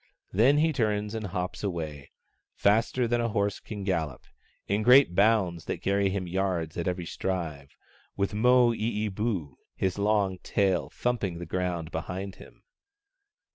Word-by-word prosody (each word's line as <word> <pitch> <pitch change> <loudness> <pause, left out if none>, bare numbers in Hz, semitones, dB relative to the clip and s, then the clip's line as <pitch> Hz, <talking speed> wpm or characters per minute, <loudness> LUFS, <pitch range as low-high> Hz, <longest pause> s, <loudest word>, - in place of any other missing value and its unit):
Then 125 +9 +4
he 160 +1 +3
turns 105 -4 0
and 110 -2 -3
hops 90 +1 -4
away, 80 -7 -4 0.5
faster 115 +4 +2
than 120 +1 +1
a 115 - 0
horse 100 -1 0
can 105 -3 -7
gallop, 80 -9 -2 0.4
in 100 +2 +1
great 125 -2 +6
bounds 95 -4 +2
that - - -4
carry 100 0 +2
him 95 -1 -2
yards 90 -3 -1
at 85 - -3
every 90 -1 -2
stride, 80 -7 -4 0.5
with 100 0 0
Moo 120 +2 +5
ee 110 -1 -1
boo, 95 - -3 0.2
his 95 +1 -1
long 100 -3 +1
tail, 95 -4 0
thumping 110 -8 -2
the 85 - -6
ground 85 -1 -2
behind 95 +4 -5
him. - - -16
100 Hz, 150 wpm, -28 LUFS, 90-110 Hz, 0.5 s, great